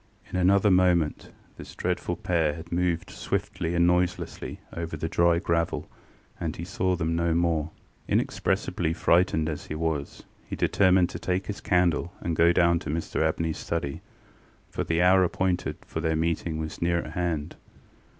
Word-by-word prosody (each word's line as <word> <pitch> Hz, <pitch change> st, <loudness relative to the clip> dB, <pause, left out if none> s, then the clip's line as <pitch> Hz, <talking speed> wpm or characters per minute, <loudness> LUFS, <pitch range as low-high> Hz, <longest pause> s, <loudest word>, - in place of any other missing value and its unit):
In -, -, -5 dB
another 95 Hz, +3 st, +4 dB
moment 90 Hz, -4 st, +2 dB, 0.3 s
this -, -, -10 dB
dreadful -, -, -2 dB
pair 80 Hz, -4 st, 0 dB
had 85 Hz, +1 st, -10 dB
moved 85 Hz, -1 st, 0 dB
swiftly 85 Hz, 0 st, -3 dB
and 85 Hz, 0 st, +4 dB
noiselessly 90 Hz, 0 st, -1 dB, 0.2 s
over 85 Hz, -1 st, -4 dB
the 80 Hz, -, -2 dB
dry 85 Hz, +1 st, +3 dB
gravel, 85 Hz, -2 st, -1 dB, 0.5 s
and 80 Hz, -2 st, -3 dB
he 85 Hz, -, -6 dB
saw 95 Hz, 0 st, 0 dB
them 80 Hz, -1 st, -1 dB
no 85 Hz, -1 st, +1 dB
more. 85 Hz, -2 st, +1 dB, 0.4 s
Inexpressibly 80 Hz, -, 0 dB
frightened 85 Hz, -2 st, +2 dB
as 75 Hz, -2 st, -5 dB
he 75 Hz, -, -4 dB
was, 80 Hz, -3 st, -3 dB, 0.2 s
he -, -, -6 dB
determined 95 Hz, -2 st, +3 dB
to -, -, -6 dB
take 90 Hz, +1 st, -1 dB
his 105 Hz, +1 st, -5 dB
candle 90 Hz, -1 st, +1 dB
and 85 Hz, -1 st, -2 dB
go 85 Hz, +2 st, +5 dB
down 85 Hz, -1 st, +3 dB
to -, -, -7 dB
Mr 80 Hz, +2 st, -2 dB
AbneyŌĆÖs 80 Hz, 0 st, 0 dB
study, 75 Hz, -5 st, -3 dB, 0.7 s
for -, -, -2 dB
the 85 Hz, +1 st, +1 dB
hour 95 Hz, +1 st, +6 dB
appointed 90 Hz, 0 st, -1 dB
for -, -, -5 dB
their 80 Hz, 0 st, 0 dB
meeting 80 Hz, 0 st, -1 dB
was 80 Hz, 0 st, -5 dB
near 85 Hz, 0 st, +2 dB
at 75 Hz, -, -4 dB
hand. 85 Hz, -2 st, -2 dB
85 Hz, 165 wpm, -27 LUFS, 80-90 Hz, 0.7 s, hour